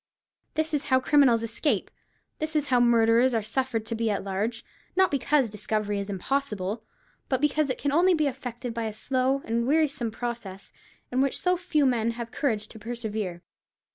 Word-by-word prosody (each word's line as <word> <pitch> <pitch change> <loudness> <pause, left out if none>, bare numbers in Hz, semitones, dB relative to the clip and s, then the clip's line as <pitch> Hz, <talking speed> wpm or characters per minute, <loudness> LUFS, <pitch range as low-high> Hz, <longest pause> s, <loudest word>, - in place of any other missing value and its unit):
This 315 0 0
is 295 0 0
how 260 -2 +4
criminals 260 -5 +4
escape—this 310 +5 -3
is 300 -2 +2
how 250 -2 +4
murderers 235 +1 +4
are 225 - +1
suffered 225 0 -1
to 230 - -3
be 225 0 0
at 205 - -1
large; 200 +4 -2 0.3
not 380 0 +4
because 280 -1 +2
discovery 210 0 -2
is 200 0 -4
impossible, 210 -1 -2 0.5
but 260 - +1
because 295 +1 +1
it 255 - -1
can 285 - -1
only 355 +4 +4
be 310 -2 +1
effected 245 -3 -4
by 230 -1 -2
a 215 - -3
slow 260 +4 0
and 235 +1 0
wearisome 280 -5 +1
process 225 -4 -6 0.4
in 255 +1 +2
which 275 -1 +1
so 360 0 +2
few 325 -5 +1
men 235 -3 +2
have 235 -1 -5
courage 220 -7 -1
to 220 - -11
persevere. 215 -6 -4
240 Hz, 175 wpm, -27 LUFS, 220-280 Hz, 0.5 s, how